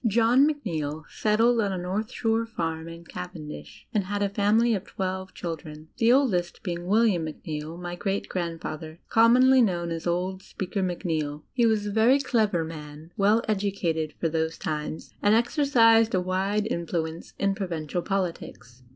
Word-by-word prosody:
John 235 Hz, +6 st, +4 dB
Macneill 160 Hz, -, -3 dB
setded 225 Hz, +2 st, +3 dB
on 200 Hz, -, 0 dB
a 190 Hz, -, -2 dB
north 190 Hz, +5 st, -3 dB
shore 225 Hz, 0 st, 0 dB
farm 165 Hz, -6 st, -3 dB
in 165 Hz, 0 st, -10 dB
Caven 175 Hz, -3 st, -7 dB
dish 150 Hz, -, -10 dB
and 205 Hz, -4 st, +1 dB
had 205 Hz, +1 st, -1 dB
a 200 Hz, -, +1 dB
family 215 Hz, +4 st, +3 dB
of 200 Hz, -3 st, -1 dB
twelve 190 Hz, -1 st, -4 dB
children, 155 Hz, -2 st, -7 dB
the 230 Hz, 0 st, +5 dB
oldest 195 Hz, -11 st, +1 dB
being 175 Hz, -2 st, -4 dB
William 210 Hz, -4 st, +3 dB
Macneill, 155 Hz, 0 st, -6 dB
my 175 Hz, 0 st, -5 dB
greai 195 Hz, +2 st, -2 dB
grandfaiher, 165 Hz, -2 st, -5 dB
commonly 250 Hz, +3 st, +6 dB
known 175 Hz, -6 st, 0 dB
as 165 Hz, +1 st, -4 dB
"Old 185 Hz, +2 st, -1 dB
Speaker 190 Hz, +1 st, -4 dB
Macneill." 160 Hz, -5 st, -2 dB
He 240 Hz, -2 st, +3 dB
was 215 Hz, -2 st, +1 dB
a 205 Hz, -, -2 dB
very 225 Hz, +6 st, +5 dB
clever 220 Hz, -10 st, +1 dB
man, 155 Hz, 0 st, -9 dB
well 210 Hz, +3 st, +3 dB
educated 190 Hz, -7 st, -1 dB
for 165 Hz, -, +1 dB
those 160 Hz, 0 st, -1 dB
times, 155 Hz, 0 st, -4 dB
and 205 Hz, +1 st, +4 dB
exercised 230 Hz, -3 st, +4 dB
a -, -, +3 dB
wide 190 Hz, +3 st, 0 dB
influence 165 Hz, -1 st, -3 dB
in 195 Hz, 0 st, +1 dB
provincial 175 Hz, -4 st, -3 dB
politics. 165 Hz, -10 st, -4 dB
185 Hz, 160 wpm, -26 LUFS, 165-220 Hz, -, commonly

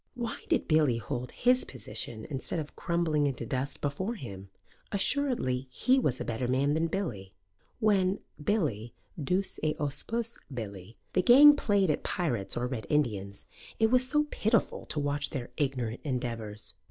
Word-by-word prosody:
Why 235 Hz, -2 st, -4 dB
did -, -, +1 dB
Billy 150 Hz, -6 st, +3 dB
hold 120 Hz, +4 st, -4 dB
his 250 Hz, +1 st, +3 dB
position 110 Hz, -2 st, -4 dB
instead 140 Hz, +2 st, -2 dB
of 155 Hz, -2 st, -5 dB
crumbling 165 Hz, -4 st, +1 dB
into 125 Hz, -4 st, -3 dB
dust 130 Hz, +4 st, -3 dB
before 185 Hz, +11 st, -2 dB
him? 100 Hz, -, -8 dB, 0.4 s
Assuredly 200 Hz, -, +1 dB
he 255 Hz, -, +3 dB
was 130 Hz, -, 0 dB
a -, -, -3 dB
better 120 Hz, +2 st, -2 dB
man 135 Hz, +3 st, +2 dB
than 160 Hz, +2 st, +1 dB
Billy. 115 Hz, -, -4 dB, 0.5 s
When, 195 Hz, -3 st, +3 dB, 0.3 s
Billy 140 Hz, -, 0 dB, 0.3 s
duce 185 Hz, +7 st, -1 dB
et 155 Hz, 0 st, -1 dB
auspice 225 Hz, +11 st, -2 dB
Billy, 105 Hz, -4 st, -7 dB, 0.2 s
the 185 Hz, -, +3 dB
gang 285 Hz, +9 st, +9 dB
played 200 Hz, -, +2 dB
at -, -, -1 dB
pirates 120 Hz, -, -1 dB
or 120 Hz, -, 0 dB
Red 120 Hz, -5 st, -4 dB
Indians, 105 Hz, -9 st, -1 dB, 0.3 s
it 220 Hz, 0 st, +4 dB
was 255 Hz, 0 st, +3 dB, 0.2 s
pitiful 220 Hz, 0 st, 0 dB
to 150 Hz, -, -1 dB
watch 145 Hz, 0 st, 0 dB
their 130 Hz, -4 st, -5 dB
ignorant 125 Hz, -5 st, -2 dB
endeavours. 115 Hz, -6 st, -4 dB
145 Hz, 155 wpm, -30 LUFS, 120-195 Hz, 0.5 s, gang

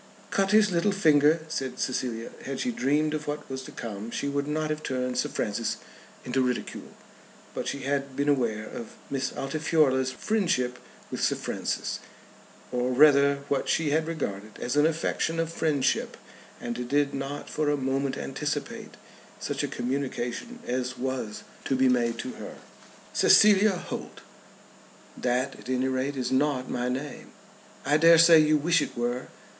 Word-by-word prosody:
"Cut 195 Hz, 0 st, +2 dB
his 210 Hz, -1 st, +5 dB
little 175 Hz, +4 st, +2 dB
finger," 155 Hz, -4 st, +4 dB
said 135 Hz, -4 st, -3 dB
Cecilia. 120 Hz, -3 st, -2 dB
Had 135 Hz, 0 st, -4 dB
she 250 Hz, -, 0 dB
dreamed 150 Hz, -, +1 dB
of 150 Hz, -1 st, -4 dB
what 150 Hz, 0 st, -4 dB
was 130 Hz, 0 st, -5 dB
to 130 Hz, -, -10 dB
come 110 Hz, -1 st, -6 dB
she 140 Hz, -, -3 dB
would 140 Hz, 0 st, -1 dB
not 155 Hz, +1 st, -1 dB
have 155 Hz, 0 st, -3 dB
turned 125 Hz, -3 st, -2 dB
Sir -, -, 0 dB
Francis 110 Hz, +2 st, -2 dB, 0.5 s
into 130 Hz, +1 st, +1 dB
ridicule. 125 Hz, -1 st, -3 dB, 0.6 s
But -, -, -4 dB
she 140 Hz, -, -3 dB
had 140 Hz, 0 st, -2 dB
been 140 Hz, +1 st, 0 dB
aware 115 Hz, -7 st, +1 dB
of 115 Hz, 0 st, -8 dB, 0.2 s
Miss 130 Hz, -2 st, -1 dB
Altifiorla's 135 Hz, -2 st, +1 dB
friendship 130 Hz, -, 0 dB, 0.3 s
with -, -, -4 dB
Sir -, -, +2 dB
Francis, -, -, -3 dB, 0.7 s
or 125 Hz, 0 st, 0 dB
rather 140 Hz, +1 st, +5 dB
what 140 Hz, -2 st, 0 dB
she 155 Hz, -3 st, +1 dB
had 155 Hz, +1 st, +1 dB
regarded 105 Hz, -10 st, -4 dB
as 125 Hz, +3 st, -2 dB
an 150 Hz, +1 st, +5 dB
affectation 165 Hz, 0 st, -1 dB
of 165 Hz, 0 st, -1 dB
friendship, 150 Hz, -6 st, 0 dB, 0.4 s
and 120 Hz, +1 st, -4 dB
did 145 Hz, 0 st, +2 dB
not 140 Hz, +1 st, -4 dB
for 155 Hz, -1 st, -1 dB
a 145 Hz, -, +2 dB
moment 135 Hz, 0 st, -1 dB
anticipate -, -, -4 dB, 0.4 s
such -, -, -2 dB
a -, -, 0 dB
communication 135 Hz, -, -3 dB
as 125 Hz, +1 st, -2 dB
was 130 Hz, -5 st, -3 dB, 0.2 s
to 135 Hz, -, +1 dB
be 130 Hz, 0 st, +4 dB
made 120 Hz, -2 st, +2 dB
to 125 Hz, -, -4 dB
her. -, -, -7 dB, 0.6 s
"Cecilia 210 Hz, -1 st, +6 dB
Holt 175 Hz, -, -7 dB, 0.5 s
" -, -, -25 dB, 0.2 s
"That 130 Hz, +2 st, -1 dB
at -, -, -11 dB
any 130 Hz, +1 st, +1 dB
rate 130 Hz, +2 st, -1 dB
is 125 Hz, -, -2 dB
not 130 Hz, -1 st, +1 dB
my 125 Hz, 0 st, -1 dB
name." 135 Hz, +3 st, -5 dB, 0.5 s
"I 145 Hz, +2 st, +4 dB
dare 165 Hz, +1 st, +7 dB
say 165 Hz, 0 st, +8 dB
you 155 Hz, 0 st, +4 dB
wish 165 Hz, +2 st, +3 dB
it -, -, -4 dB
were." 120 Hz, +1 st, -2 dB
140 Hz, 165 wpm, -27 LUFS, 125-155 Hz, 0.7 s, say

